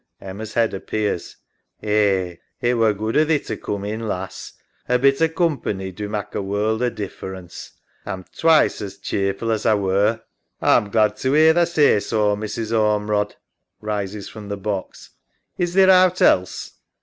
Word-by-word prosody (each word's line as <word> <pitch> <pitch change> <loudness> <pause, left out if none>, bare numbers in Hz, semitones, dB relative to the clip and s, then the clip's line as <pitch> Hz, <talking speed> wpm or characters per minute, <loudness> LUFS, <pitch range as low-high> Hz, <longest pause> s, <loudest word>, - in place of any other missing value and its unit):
{Emma's 100 +3 -8
head 115 -2 +2
appears) 100 -2 -3 0.5
Eh, 100 -4 +1 0.2
it 120 -1 +1
were 115 -2 +3
good 110 +2 -3
o' 150 - +5
thee 155 0 +2
to - - -5
coom 100 -1 -5
in, 110 +2 -4
lass. 95 -2 -5 0.4
A 125 - +4
bit 135 +3 +3
o' 165 - +5
coom 165 -3 0
pany 95 -2 -4
do 105 +2 -5
mak' 105 -1 -4
a - - -2
world 105 +3 -1
o' 125 - +2
difference. 95 -4 -8 0.3
A'm 95 -3 -6
twice 160 -7 +3
as 100 -1 -7
cheer 100 0 -1
ful 115 +2 -3
as 110 -1 -1
A 110 - +3
were. 100 +3 +1 0.4
EMMA. - - +2
A'm 105 - +1
glad 110 0 +2
to 130 +2 0
'ear 160 +1 +6
tha 170 0 +3
say 150 -10 +4
so, 105 -1 +1
Mrs. 110 +1 -4
Ormerod. 105 -1 +1 0.4
{Rises 105 -1 -4
from 105 -2 -10
the 100 - -3
box) 100 -1 -5 0.5
Is 175 0 -1
theer 190 0 +7
owt 185 -1 +5
else.? 90 0 +2
105 Hz, 175 wpm, -21 LUFS, 100-120 Hz, 0.5 s, theer